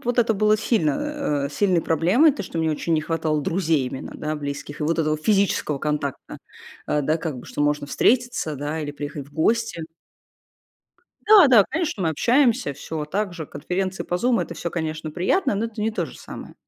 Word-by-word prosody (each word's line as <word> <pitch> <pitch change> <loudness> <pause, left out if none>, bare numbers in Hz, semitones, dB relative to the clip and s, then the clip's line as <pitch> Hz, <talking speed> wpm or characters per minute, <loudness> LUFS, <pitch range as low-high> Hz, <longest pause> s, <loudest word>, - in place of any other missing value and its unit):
вот 245 +1 -1
это 230 -1 +4
было 215 +1 +3
сильно, 210 - +1 0.5
э, 140 - -2
сильной 180 +2 +1
проблемой, 185 - +4
то, 260 - -5
что 170 - -8
мне 160 -1 +1
очень 165 +2 -1
не 155 - +1
хватало 155 -2 -1
друзей 160 -6 +1
именно, 130 - -6
да, 155 0 -3
близких, 145 0 -6
и - - -1
вот 165 +2 0
этого 155 -1 +1
физического 195 -6 +1
контакта. 150 -2 -3 0.5
Э, 150 -1 0
да, 155 +4 +1
как 155 -6 -4
бы, - - -11
что - - -6
можно 145 0 +1
встретиться, 235 - +1
да, 150 +3 -3
или 145 -1 -4
приехать 145 -1 -6
в - - -24
гости. 225 +1 0 1.5
Да, 415 -7 +9
да, 225 -6 +7
конечно, 315 - -2
мы 165 - +2
общаемся, 245 - +2
всё 150 +2 -5
так 195 +4 -2
же, 160 -4 -6
конференции 185 +4 -3
по - - -4
Zoom 235 +6 +2
это 170 - -7
всё, 170 +1 -4
конечно, 155 -2 -4
приятно, 205 - +1
но 215 +3 -1
это 225 -1 -8
не 220 +1 +1
то 220 - -2
же - - -12
самое. - - -10
165 Hz, 200 wpm, -23 LUFS, 150-215 Hz, 1.5 s, Да